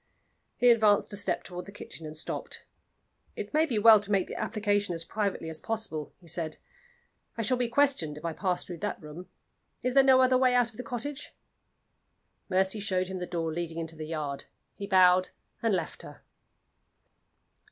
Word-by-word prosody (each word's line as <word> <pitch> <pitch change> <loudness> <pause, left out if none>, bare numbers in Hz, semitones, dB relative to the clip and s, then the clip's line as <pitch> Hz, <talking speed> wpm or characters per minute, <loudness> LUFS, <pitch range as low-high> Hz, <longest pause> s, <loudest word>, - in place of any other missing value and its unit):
He 245 0 +6
advanced 215 -2 +3
a - - +1
step 205 0 0
toward 180 0 -8
the - - -9
kitchen, 165 -5 -9
and 155 0 -9
stopped. 155 - -5 0.7
"It - - -6
may 315 +2 +3
be 240 -7 -1
well 215 0 +8
to 205 0 -7
make 195 -2 +3
the - - -8
application 205 -3 0
as 165 0 -5
privately 200 -4 -2
as 160 -1 -3
possible," 215 -10 -4
he 175 - -19
said. 160 -1 -3 0.8
"I 225 - -1
shall 255 +4 +3
be 245 -1 0
questioned 235 - +2
if 150 - -9
I 165 - -1
pass 180 0 -1
through 175 -2 -8
that 210 - -3
room. 160 +2 -10 0.5
Is 250 - 0
there 275 - +7
no 265 -1 +6
other 255 0 +4
way 255 -1 +4
out 245 -2 +3
of 215 - -19
the - - -4
cottage?" 270 +5 -6 1.1
Mercy 190 +2 +1
showed 185 -2 0
him 190 -1 -4
the 180 - -4
door 165 -2 -2
leading 165 0 -4
into 165 -1 -4
the 155 -1 -7
yard. 150 -3 -4 0.3
He 200 - -7
bowed 185 -1 +5 0.3
and 230 - +1
left 180 -5 -2
her. - - -12
195 Hz, 190 wpm, -29 LUFS, 165-225 Hz, 1.1 s, well